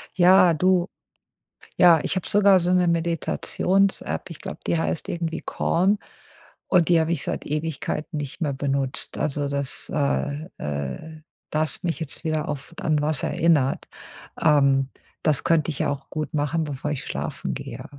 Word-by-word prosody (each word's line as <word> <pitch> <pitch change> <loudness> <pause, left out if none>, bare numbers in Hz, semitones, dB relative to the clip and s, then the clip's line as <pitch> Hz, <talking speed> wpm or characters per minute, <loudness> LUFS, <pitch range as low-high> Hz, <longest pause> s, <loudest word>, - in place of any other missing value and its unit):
Ja, 180 -1 +6
du 180 +2 +2 0.9
ja, 170 -3 +7
ich - - -1
habe 185 - -3
sogar 200 -2 +5
so 175 +1 +1
‘ne 180 -1 +3
Meditations-App. 170 - 0
Ich - - -9
glaube, - - -7
die 85 -1 +1
heißt 80 0 -2
irgendwie 165 -1 -3
„Calm“ 190 +5 +1 0.7
und 175 -3 +4
die 170 -2 +5
habe 160 0 0
ich 155 - 0
seit - - -3
Ewigkeiten 155 +1 -3
nicht 145 -2 -6
mehr 150 -4 0
benutzt. 135 -1 -2
Also 145 -1 -1
das, 140 -1 -1
äh 70 - -1
äh 75 - -5 0.3
da 155 - 0
hast 155 - +1
du 180 - -1
mich 165 - -2
jetzt 160 +2 -6
wieder 155 -1 -1
auf 145 +3 -6
an 155 -2 +1
was 150 -1 0
erinnert. 155 -5 +2 0.5
Ähm, 140 -3 +4 0.3
das 150 -3 +2
könnte 165 -1 +2
ich 145 - -6
ja - - +1
auch 140 -1 -5
gut 155 -3 -4
machen, 150 +2 0
bevor 145 0 -4
ich 140 - -5
schlafen - - -4
gehe. - - -7
155 Hz, 165 wpm, -24 LUFS, 140-170 Hz, 0.9 s, ja